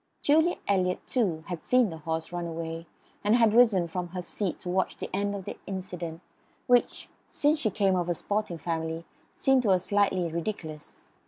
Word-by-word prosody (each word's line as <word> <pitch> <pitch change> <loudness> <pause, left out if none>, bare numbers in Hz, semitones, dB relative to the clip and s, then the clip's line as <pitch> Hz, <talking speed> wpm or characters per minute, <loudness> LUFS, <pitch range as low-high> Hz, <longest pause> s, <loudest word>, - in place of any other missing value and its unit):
Julia 320 +4 +4
Eliot, 185 -2 +1
too, 185 -11 0
had 175 -4 -5
seen 250 -6 +3
the 160 - -7
horse 160 +1 -3
run 175 -1 -3
away, 165 0 -5 0.4
and 210 +2 +4
had 230 -3 +4
risen 220 -7 +5
from 175 +1 -3
her 180 +1 -5
seat 190 0 -2
to 180 - -5
watch 185 +1 0
the - - -6
end 200 +1 0
of 195 -2 -6
the - - -6
incident, 180 -3 -5 0.4
which, 245 -1 +2 0.2
since 300 +1 +1
she 225 - +1
came 195 -1 +2
of 175 -1 -1
a 175 - +1
sporting 205 -1 -2
family, 160 0 -3 0.3
seemed 270 -1 +3
to 225 - 0
her 190 - +6
slightly 190 -1 +1
ridiculous. 160 -2 -6
185 Hz, 185 wpm, -28 LUFS, 165-210 Hz, 0.4 s, her